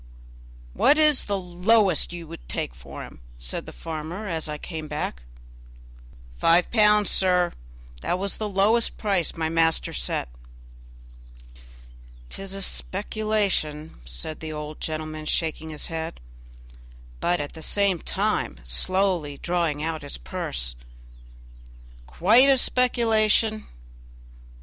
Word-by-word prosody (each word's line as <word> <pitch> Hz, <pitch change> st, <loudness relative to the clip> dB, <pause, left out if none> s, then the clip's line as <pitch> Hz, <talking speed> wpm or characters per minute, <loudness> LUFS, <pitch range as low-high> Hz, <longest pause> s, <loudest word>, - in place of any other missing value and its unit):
"What 290 Hz, -, +5 dB
is 305 Hz, -3 st, +4 dB
the 200 Hz, -1 st, -1 dB
lowest 180 Hz, 0 st, +2 dB
you 175 Hz, -1 st, -7 dB
will -, -, -9 dB
take -, -, -3 dB
for 70 Hz, +3 st, -9 dB
him?" -, -, -12 dB, 0.2 s
said -, -, -5 dB
the -, -, -7 dB
farmer 165 Hz, +6 st, -6 dB
as 160 Hz, -4 st, -3 dB
I 150 Hz, -, -3 dB
came 160 Hz, -1 st, -6 dB
back. 150 Hz, -, -4 dB, 1.1 s
"Five 170 Hz, -, +4 dB
pounds, 210 Hz, -2 st, +5 dB
sir; 180 Hz, -2 st, +3 dB, 0.5 s
that 180 Hz, -, 0 dB
was 195 Hz, +1 st, -2 dB
the 215 Hz, -1 st, -3 dB
lowest 210 Hz, +4 st, +2 dB
price 195 Hz, -5 st, 0 dB
my 160 Hz, -1 st, -1 dB
master 165 Hz, 0 st, +2 dB
set." -, -, -1 dB, 2.0 s
"'Tis 195 Hz, 0 st, -6 dB
a 195 Hz, -, -4 dB
speculation," 195 Hz, -, -1 dB
said 60 Hz, -, -4 dB
the 160 Hz, -1 st, -6 dB
old 150 Hz, 0 st, -6 dB
gentleman, 155 Hz, 0 st, -4 dB
shaking 160 Hz, -1 st, -1 dB
his 150 Hz, -1 st, -4 dB
head, 165 Hz, 0 st, -5 dB, 1.0 s
but 175 Hz, 0 st, +1 dB
at 145 Hz, 0 st, -5 dB
the 160 Hz, -, -10 dB
same 195 Hz, +1 st, +2 dB
time 65 Hz, -, -1 dB
slowly 170 Hz, -, +1 dB
drawing 170 Hz, -4 st, -1 dB
out 160 Hz, -1 st, -2 dB
his 145 Hz, -, -6 dB
purse, -, -, -4 dB, 1.3 s
"quite 225 Hz, -, +5 dB
a 270 Hz, -, +6 dB
speculation! 225 Hz, -4 st, +3 dB
175 Hz, 120 wpm, -25 LUFS, 155-205 Hz, 2.0 s, a